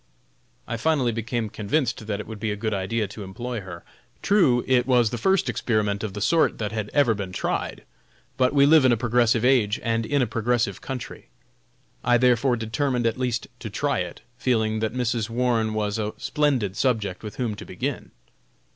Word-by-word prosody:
I 115 Hz, -, -3 dB
finally 135 Hz, -1 st, +1 dB
became 115 Hz, 0 st, -2 dB
convinced 115 Hz, +2 st, -2 dB
that 105 Hz, -1 st, -2 dB
it -, -, -5 dB
would 110 Hz, -1 st, -8 dB
be 110 Hz, -, -2 dB
a 105 Hz, -, -1 dB
good 110 Hz, +1 st, -2 dB
idea 105 Hz, +3 st, -1 dB
to 105 Hz, +1 st, -8 dB
employ 120 Hz, +4 st, -5 dB
her. 90 Hz, -3 st, -9 dB, 0.4 s
True, 145 Hz, -13 st, +4 dB
it 130 Hz, -1 st, +2 dB
was 120 Hz, -4 st, +3 dB
the 120 Hz, -, -3 dB
first 190 Hz, -, +2 dB
experiment 105 Hz, -3 st, 0 dB
of 105 Hz, -3 st, -4 dB
the 105 Hz, -, -5 dB
sort 165 Hz, +9 st, +3 dB
that 105 Hz, -1 st, -3 dB
had 110 Hz, -1 st, -3 dB
ever 140 Hz, -6 st, +3 dB
been 100 Hz, -3 st, -5 dB
tried; -, -, -3 dB, 0.5 s
but 130 Hz, 0 st, +2 dB
we 140 Hz, -1 st, +5 dB
live 155 Hz, 0 st, +6 dB
in 130 Hz, -, +5 dB
a 120 Hz, -, +3 dB
progressive 120 Hz, 0 st, +2 dB
age, 120 Hz, -6 st, +3 dB
and 115 Hz, -1 st, 0 dB
in 140 Hz, +3 st, +1 dB
a -, -, +2 dB
progressive 115 Hz, -3 st, -1 dB
country. 130 Hz, -3 st, -7 dB, 0.7 s
I 120 Hz, -, +4 dB
therefore 125 Hz, +1 st, +3 dB
determined 120 Hz, +2 st, -1 dB
at 115 Hz, +2 st, 0 dB
least 125 Hz, -2 st, -1 dB
to -, -, -6 dB
try -, -, -1 dB
it, -, -, -5 dB, 0.2 s
feeling 110 Hz, -3 st, +1 dB
that 110 Hz, 0 st, -1 dB
Mrs. 120 Hz, -2 st, -1 dB
Warne 115 Hz, -2 st, +1 dB
was 105 Hz, 0 st, -1 dB
a 105 Hz, 0 st, -2 dB
splendid 130 Hz, -10 st, 0 dB
subject 105 Hz, -7 st, 0 dB
with 105 Hz, -2 st, -7 dB
whom 120 Hz, -4 st, -2 dB
to 105 Hz, -, -8 dB
begin. -, -, -4 dB
115 Hz, 190 wpm, -24 LUFS, 105-125 Hz, 0.7 s, live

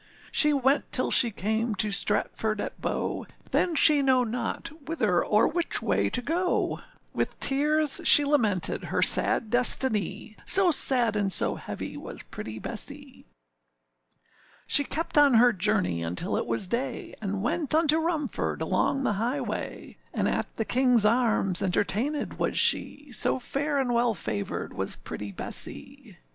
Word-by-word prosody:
She 300 Hz, -, +5 dB
went 275 Hz, 0 st, 0 dB
till 255 Hz, -, +2 dB
she 240 Hz, -, +7 dB
came 220 Hz, +2 st, -3 dB
to 210 Hz, +2 st, 0 dB
Stratford 210 Hz, +1 st, 0 dB
at -, -, -6 dB
Bow, -, -, -4 dB, 0.2 s
Then 345 Hz, -3 st, 0 dB
she 295 Hz, -1 st, +5 dB
know 260 Hz, -2 st, +2 dB
not 245 Hz, +7 st, -5 dB, 0.2 s
whither 215 Hz, -, 0 dB
or 210 Hz, +1 st, +2 dB
which 345 Hz, +1 st, 0 dB
way -, -, -1 dB
to 250 Hz, -, -3 dB
go, 350 Hz, +6 st, -1 dB, 0.3 s
With -, -, -4 dB
tears 300 Hz, +2 st, +2 dB
she 290 Hz, -, +7 dB
lamented 225 Hz, -, 0 dB
her -, -, 0 dB
sad 220 Hz, -3 st, +2 dB
destiny; 220 Hz, -4 st, 0 dB
So 380 Hz, -2 st, +4 dB
sad 245 Hz, -7 st, +5 dB
and 200 Hz, -2 st, -1 dB
so -, -, 0 dB
heavy -, -, -8 dB
was -, -, -8 dB
pretty 110 Hz, 0 st, -9 dB
Bessee. -, -, -4 dB, 1.4 s
She 285 Hz, -, +5 dB
kept 315 Hz, 0 st, -1 dB
on 285 Hz, -4 st, +4 dB
her 240 Hz, +1 st, +5 dB
journey 90 Hz, -, 0 dB
until 90 Hz, -, -3 dB
it -, -, -3 dB
was 200 Hz, -, -3 dB
day, 235 Hz, +8 st, -4 dB
And 200 Hz, -1 st, -4 dB
went 305 Hz, +4 st, +1 dB
unto 315 Hz, -1 st, +3 dB
Rumford, 320 Hz, -3 st, -3 dB
along 275 Hz, -, -1 dB
the 215 Hz, -, 0 dB
highway; 250 Hz, +5 st, -5 dB, 0.2 s
And -, -, 0 dB
at -, -, -3 dB
the 225 Hz, -, -3 dB
Kingâs 245 Hz, -3 st, +2 dB
Arms 220 Hz, -5 st, +2 dB
entertainèd 215 Hz, +10 st, -2 dB
was -, -, -1 dB
she, 290 Hz, -2 st, +1 dB
So 245 Hz, -, +1 dB
fair 285 Hz, +3 st, -3 dB
and 255 Hz, -3 st, -1 dB
well 235 Hz, -1 st, +1 dB
favoured 105 Hz, -, -5 dB
was -, -, -4 dB
pretty 105 Hz, -1 st, -8 dB
Bessee. 95 Hz, -, -4 dB
245 Hz, 150 wpm, -26 LUFS, 210-290 Hz, 1.4 s, she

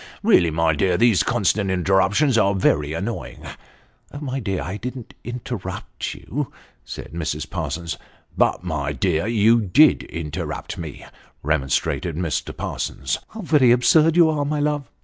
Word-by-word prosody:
Really, 85 Hz, -2 st, +5 dB
my 80 Hz, 0 st, +2 dB
dear, 90 Hz, +4 st, +1 dB
these 115 Hz, -2 st, +4 dB
constant 100 Hz, 0 st, +1 dB
interruptions 95 Hz, -, +2 dB
are 100 Hz, -3 st, +3 dB
very 75 Hz, -5 st, +1 dB
annoying." 80 Hz, -, -5 dB, 0.4 s
" 145 Hz, -, -14 dB
My 135 Hz, -2 st, -3 dB
dear, 95 Hz, -6 st, -2 dB
I 90 Hz, +4 st, -4 dB
didn't 125 Hz, 0 st, -7 dB
interrupt 120 Hz, -3 st, -5 dB
yon," 145 Hz, +2 st, -4 dB, 0.4 s
said -, -, -8 dB
Mrs. 75 Hz, -2 st, -3 dB
Parsons. 85 Hz, 0 st, -4 dB, 0.2 s
" -, -, -34 dB
But, -, -, -3 dB
my 75 Hz, -5 st, -2 dB
dear, 80 Hz, +5 st, 0 dB
you 115 Hz, +1 st, +4 dB
did 125 Hz, -, +5 dB
interrupt 80 Hz, -3 st, -5 dB
me," 80 Hz, -4 st, -7 dB, 0.4 s
remonstrated 75 Hz, +3 st, 0 dB
Mr. 85 Hz, -2 st, -3 dB
Parsons. 65 Hz, -2 st, -3 dB
" -, -, -45 dB
How 220 Hz, -, -5 dB
very 150 Hz, -, +4 dB
absurd 155 Hz, +6 st, +4 dB
you 170 Hz, -2 st, +7 dB
are, 150 Hz, -2 st, -1 dB
my 150 Hz, +1 st, -1 dB
love 145 Hz, -3 st, -1 dB
95 Hz, 150 wpm, -22 LUFS, 80-125 Hz, 0.4 s, you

